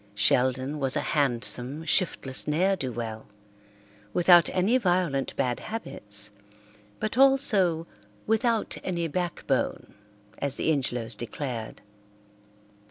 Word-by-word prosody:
Sheldon 130 +7 +1
was 135 -1 +2
a - - +1
handsome, 135 +1 0
shiftless 135 -7 +3
ne'er 180 +6 +2
do 130 -8 -4
well, 110 -2 -6 0.9
without 175 -1 +6
any 205 +8 +2
violent 175 - 0
bad 125 -2 -1
habits, 105 - -5 0.7
but 215 +3 -2
also 210 -12 +3 0.4
"without 225 0 0
any 170 -2 -2
backbone," 175 +2 -2 0.5
as 140 -1 0
the - - 0
Ingelows 125 -5 -2
declared. 120 -1 -6
150 Hz, 100 wpm, -26 LUFS, 125-185 Hz, 0.9 s, without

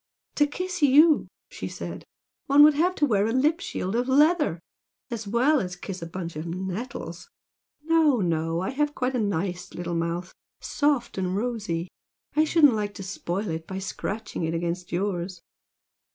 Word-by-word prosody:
"To 295 - +4
kiss 365 +4 -4
YOU," 295 +3 +6 0.2
she - - -6
said, - - -7 0.4
"one 285 +1 +7
would 305 0 +8
have 350 +5 +1
to 295 - +3
wear 210 -5 +2
a - - 0
lip 295 +7 +2
shield 195 - -3
of 245 +2 0
leather! 295 - +3 0.5
As 225 -3 -4
well 255 +6 +3 0.2
kiss 185 -2 -6
a 165 - -5
bunch 170 -1 -6
of 155 +2 -5
nettles! 190 - -5 0.5
No, 315 -5 +4
no! 165 -2 0
I 190 - -2
have 295 +2 -1
quite 255 +1 -1
a - - +1
nice 180 -3 -2
little 175 0 -4
mouth 170 +2 -2 0.3
soft 285 -8 0
and 185 0 -1
rosy! 205 -7 -2 0.5
I 310 +1 +4
shouldn't 305 -4 +5
like 205 -1 -2
to 195 - -7
spoil 190 +1 -3
it 160 0 -4
by 190 - -5
scratching 195 +1 -4
it 160 +1 -1
against 175 +1 -3
yours! 180 -1 -2
210 Hz, 165 wpm, -26 LUFS, 175-290 Hz, 0.5 s, would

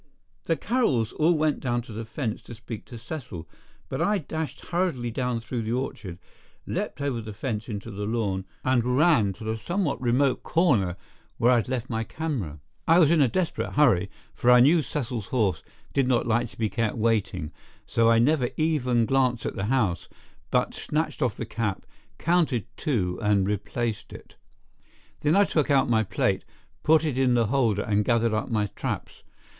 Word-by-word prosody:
The 165 - +2
Carrolls 180 - +1
all 160 +2 +3
went 155 -1 +1
down 120 -2 -1
to 115 - -11
the 115 +2 -5
fence 115 0 -4
to 120 - -9
speak 115 -1 -8
to 120 - -10
Cecil, 115 - -7 0.4
but - - -3
I 210 0 +2
dashed 160 -2 -5
hurriedly 170 -10 0
down 125 0 -1
through 115 +1 -4
the 110 +1 -2
orchard, 115 -8 -4 0.5
leaped 135 - -3
over 135 -5 -1
the 110 -2 -8
fence 110 -1 -4
into 105 -3 -5
the 105 +1 -4
lawn 100 -4 -1 0.2
and 125 -1 +2
ran 150 - +4
to 100 - -11
the 110 +1 -2
somewhat 170 - -1
remote 130 +2 +2
corner 120 - +2 0.4
where 120 +2 +4
I 125 - +5
had 115 - -1
left 130 -2 -2
my 115 -1 -2
camera. 115 - -4 0.3
I 165 +1 +6
was 165 -4 +5
in 165 -3 +4
a 135 - +5
desperate 175 +8 -2
hurry, 105 -10 +4 0.2
for 120 - +1
I 125 0 +8
knew 155 +7 +6
Cecil's 120 -8 -4
horse 100 -10 0 0.3
did 135 -2 +2
not 125 -2 +2
like 120 +1 +1
to - - -18
be 110 - +1
kept 110 +2 -1
waiting, 100 -8 0 0.3
so 115 0 +2
I 115 - +5
never 125 +1 +3
even 130 -7 +2
glanced 125 -2 +1
at - - -3
the 95 - -2
house, 105 -8 0 0.4
but - - +1
snatched 155 0 -2
off 125 -5 0
the 115 - -4
cap, 110 -3 -3 0.3
counted 160 - +1
two 95 -12 -1
and 105 -3 +2
replaced 105 +3 -3
it. - - -12 0.9
Then 150 +2 +2
I 200 - +6
took 155 -7 0
out 135 -2 +3
my 110 -1 +4
plate, 110 - 0 0.4
put 160 0 +4
it 135 -4 -1
in 125 -2 +3
the 115 -1 +3
holder 115 -7 +2
and 105 0 +1
gathered 115 0 +2
up 110 - -1
my 110 -3 +1
traps. - - -4
120 Hz, 185 wpm, -26 LUFS, 110-145 Hz, 0.9 s, I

